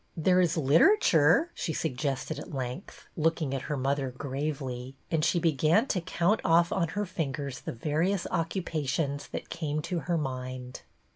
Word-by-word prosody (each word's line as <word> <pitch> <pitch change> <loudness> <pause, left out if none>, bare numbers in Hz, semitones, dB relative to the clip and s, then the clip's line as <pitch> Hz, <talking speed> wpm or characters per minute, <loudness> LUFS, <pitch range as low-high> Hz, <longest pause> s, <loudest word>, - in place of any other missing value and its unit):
There 180 +3 +4
is 170 -2 +1
literature," 165 - +5
she 160 - -3
suggested 140 0 -2
at 180 - -9
length, 130 +6 -6
looking 160 -3 0
at 135 - -2
her 150 - -1
mother 135 0 0
gravely; 135 -1 -4 0.2
and 160 -2 +1
she 170 +2 +2
began 165 - +3
to 185 - 0
count 185 +4 +1
off 170 0 +4
on 180 -3 +1
her 210 - +1
fingers 145 -7 -3
the - - -5
various 165 - 0
occupations 155 -4 -1
that - - -7
came 155 -2 -2
to 180 0 -2
her 170 0 -1
mind. 130 -3 -5
155 Hz, 155 wpm, -29 LUFS, 135-170 Hz, 0.2 s, literature